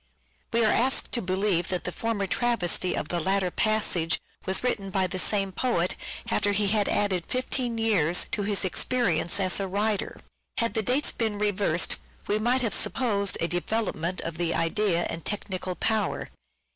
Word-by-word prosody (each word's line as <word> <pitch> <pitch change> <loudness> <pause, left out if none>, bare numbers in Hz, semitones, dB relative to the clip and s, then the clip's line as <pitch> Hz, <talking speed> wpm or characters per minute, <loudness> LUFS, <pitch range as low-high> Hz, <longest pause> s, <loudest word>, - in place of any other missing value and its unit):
We 230 -1 +3
are 215 - +4
asked 260 +3 +2
to 240 - 0
believe 185 -1 0
that 180 -1 -2
the 180 - -3
former 225 0 -1
travesty 195 -5 0
of - - -3
the 175 - 0
latter 190 +1 +1
passage 205 -7 +1 0.3
was 190 +4 +1
written 205 -6 -1
by 190 0 +1
the 185 +1 -2
same 195 0 +1
poet 185 -4 0 0.4
after 205 0 +2
he 200 0 +2
had 210 0 +2
added 190 -4 +1
fifteen 255 -2 -1
years 190 -7 +2
to - - -1
his 200 -1 0
experience 185 -3 +1
as 185 0 +2
a 195 - -1
writer. 205 +2 -1 0.4
Had 230 0 +1
the 220 - +1
dates 255 +7 +1
been 220 -3 -2
reversed 205 -5 +1 0.3
we 210 +1 0
might 245 +3 +2
have 225 - +1
supposed 200 -6 +1
a 170 - +2
development 175 -1 -2
of 165 0 -5
the 170 -1 +1
idea 175 +1 +1
and 165 -1 -5
technical 190 -3 -3
power. 215 -1 -1
200 Hz, 170 wpm, -26 LUFS, 180-220 Hz, 0.4 s, are